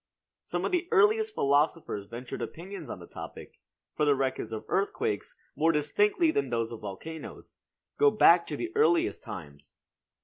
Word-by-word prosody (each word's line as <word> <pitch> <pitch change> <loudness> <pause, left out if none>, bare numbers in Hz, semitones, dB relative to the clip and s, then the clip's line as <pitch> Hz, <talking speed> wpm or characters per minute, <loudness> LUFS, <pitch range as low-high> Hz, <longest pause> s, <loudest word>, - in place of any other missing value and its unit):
Some - - -3
of - - -1
the 355 -1 0
earliest 430 0 +3
philosophers 140 -7 +1
ventured 120 +2 -7
opinions 175 -3 -7
on - - -5
the 85 - -10
topic; - - -10 0.4
for 150 - 0
the 145 -1 +4
records 130 -3 -2
of 110 - -5
earthquakes, 430 - -1 0.2
more 165 +2 +3
distinctly 205 - +2
than 140 - -1
those 115 -1 -1
of 115 - -7
volcanoes, 130 +11 -8 0.4
go 435 - +7
back - - +5
to - - -4
the 350 +1 -5
earliest 355 -6 +3
times. 70 -3 -10
160 Hz, 160 wpm, -29 LUFS, -, 0.4 s, go